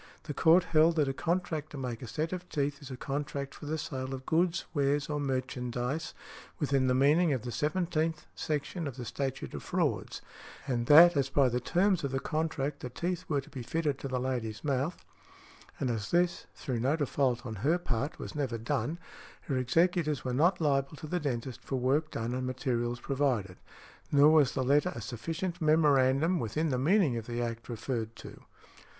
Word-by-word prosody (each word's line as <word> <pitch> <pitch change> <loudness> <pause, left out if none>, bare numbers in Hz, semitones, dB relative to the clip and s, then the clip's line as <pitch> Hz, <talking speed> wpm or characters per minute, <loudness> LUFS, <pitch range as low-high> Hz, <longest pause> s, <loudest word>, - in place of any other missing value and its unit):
The 155 -2 -5
court 165 +5 +5
held 165 -1 +4
that 150 -3 +2
a 135 - -1
contract 160 -1 -2
to 150 - -8
make 125 -4 -4
a 125 - -6
set 155 +8 -2
of 180 0 -6
teeth 145 -1 -1
is 140 - -9
a 130 - -6
contract 140 0 -4
for 145 - -10
the 155 +2 -1
sale 135 -3 -4
of 130 0 -10
goods, 170 +1 +1
wares 145 -1 +1
or 150 - -1
merchandise 130 +1 -2 0.4
within 135 -3 +1
the 125 - +3
meaning 150 +5 +4
of 125 -5 -2
the 120 - -4
seventeenth 155 - -1
section 155 +2 -3
of 135 - -7
the 125 - -5
Statute 130 +3 -4
of - - -5
Frauds; - - -1 0.4
and 120 -3 -1
that 170 +3 +9
as 135 -1 +1
by 135 -1 +4
the 125 +1 0
terms 180 - +2
of 140 - 0
the 135 0 -1
contract 150 -1 -2
the 125 - -6
teeth 175 +7 -3
were 145 -3 +1
to - - -16
be 135 - -6
fitted 145 +2 -1
to - - -4
the 130 -1 -1
lady's 120 -4 -3
mouth, 140 +3 -1 0.7
and 130 -3 0
as 105 -3 -3
this, 175 0 +1
through 130 -6 -3
no 135 +6 +2
default 135 -4 0
on 110 -3 -5
her 150 - +2
part, 140 -3 -3
was - - -7
never 135 -6 -2
done, 145 +7 -2 0.4
her 140 - -3
executors 155 +4 +1
were 125 - -1
not 175 +8 +3
liable 140 -2 +1
to 150 - -9
the 180 +4 -1
dentist 130 -4 -3
for 135 - -4
work 135 +5 +1
done 115 +1 -3
and 130 0 -2
materials 120 -1 -1
provided; 120 -9 -1 0.5
nor 145 +1 +7
was 150 -5 +5
the 130 - 0
letter 140 +3 +3
a - - -5
sufficient 165 - -4
memorandum 155 +1 +4
within 155 +8 -1
the 130 -3 0
meaning 155 - +3
of 115 - -6
the 120 0 -3
Act 115 0 -4
referred 115 -1 -3
to. - - -11
140 Hz, 195 wpm, -30 LUFS, 125-155 Hz, 0.7 s, that